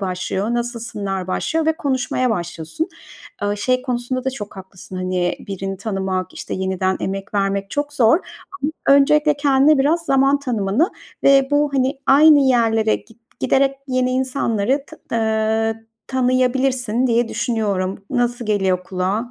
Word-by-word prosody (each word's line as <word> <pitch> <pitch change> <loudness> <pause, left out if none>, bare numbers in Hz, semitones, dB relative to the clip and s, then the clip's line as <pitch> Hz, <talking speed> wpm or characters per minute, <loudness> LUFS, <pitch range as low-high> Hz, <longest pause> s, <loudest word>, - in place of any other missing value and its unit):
başlıyor, 190 +4 -2
nasılsınlar 230 -6 -3
başlıyor 320 +11 -1
ve 320 - +4
konuşmaya 260 -3 0
başlıyorsun. 170 - -3 0.5
Iıı, 205 0 0
şey 255 +4 0
konusunda 255 0 -3
da 265 - 0
çok 205 -6 -8
haklısın. 190 0 -9
Hani, 185 -1 -1
birini 195 0 -4
tanımak, 190 -2 -3
işte, - - -5
yeniden 190 0 -1
emek 195 +1 -4
vermek 195 0 0
çok 290 0 -2
zor. 250 +3 +4 0.7
Öncelikle 295 +2 +5
kendine 285 +1 +4
biraz 305 +5 +2
zaman 275 +1 +3
tanımanı 240 - 0 0.4
ve 275 -1 +5
bu 290 0 +2
hani 265 +1 +1
aynı 300 +2 +7
yerlere 225 -4 +3
git 225 0 -18 0.2
giderek 270 0 +2
yeni 255 0 +1
insanları 260 -1 0
t 315 - -13 0.2
ııı, 220 0 0 0.2
tanıyabilirsin 255 -1 +1
diye 235 -1 +1
düşünüyorum. 200 -4 -2
Nasıl 245 -2 -1
geliyor 190 -3 +1
kulağa? 195 +7 -2
235 Hz, 135 wpm, -20 LUFS, 195-270 Hz, 0.7 s, aynı